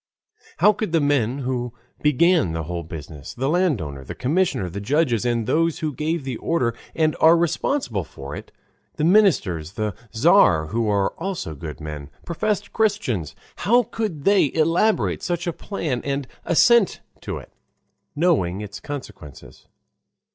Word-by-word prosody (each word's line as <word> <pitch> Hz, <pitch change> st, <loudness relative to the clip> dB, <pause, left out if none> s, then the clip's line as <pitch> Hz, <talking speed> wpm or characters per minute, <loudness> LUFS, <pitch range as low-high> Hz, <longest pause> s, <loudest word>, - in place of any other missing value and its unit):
How 210 Hz, -, +5 dB
could 210 Hz, -4 st, -4 dB
the 165 Hz, -, +4 dB
men 140 Hz, -4 st, +1 dB
who 125 Hz, -2 st, -2 dB, 0.3 s
began 150 Hz, -, +3 dB
the 80 Hz, 0 st, -3 dB
whole 85 Hz, +2 st, -4 dB
business, 75 Hz, -3 st, -9 dB
the 130 Hz, +2 st, -1 dB
landowner, 130 Hz, -, 0 dB
the -, -, -8 dB
commissioner, 150 Hz, -, 0 dB
the 95 Hz, +4 st, -6 dB
judges, 125 Hz, -1 st, +1 dB
and 120 Hz, -2 st, 0 dB
those 165 Hz, +5 st, +1 dB
who 155 Hz, -2 st, -3 dB
gave 155 Hz, +2 st, -2 dB
the 130 Hz, -3 st, -4 dB
order 125 Hz, -9 st, 0 dB, 0.2 s
and 155 Hz, -1 st, +2 dB
are 165 Hz, +2 st, +7 dB
responsible 165 Hz, -, 0 dB
for 70 Hz, -1 st, -9 dB
it, -, -, -10 dB, 0.4 s
the -, -, -2 dB
ministers, 150 Hz, -, +3 dB
the 105 Hz, 0 st, -2 dB, 0.2 s
Tzar, 110 Hz, -, +4 dB
who 115 Hz, 0 st, 0 dB
are 100 Hz, -1 st, +1 dB
also 175 Hz, -, -4 dB
good 75 Hz, +1 st, -8 dB
men, 75 Hz, -2 st, -7 dB, 0.2 s
professed 200 Hz, +4 st, -2 dB
Christians, 130 Hz, -, 0 dB, 0.2 s
how 240 Hz, +6 st, +3 dB
could 215 Hz, -10 st, -4 dB
they 195 Hz, -7 st, +4 dB
elaborate 165 Hz, +7 st, +2 dB
such 175 Hz, -1 st, -2 dB
a 170 Hz, -, -1 dB
plan 155 Hz, -, -3 dB
and 140 Hz, -1 st, -2 dB, 0.2 s
assent 230 Hz, +4 st, +4 dB, 0.2 s
to -, -, -5 dB
it, -, -, -12 dB, 0.6 s
knowing 140 Hz, -, +1 dB
its 105 Hz, 0 st, -7 dB
consequences? 130 Hz, -, -9 dB
140 Hz, 150 wpm, -22 LUFS, -, 0.6 s, are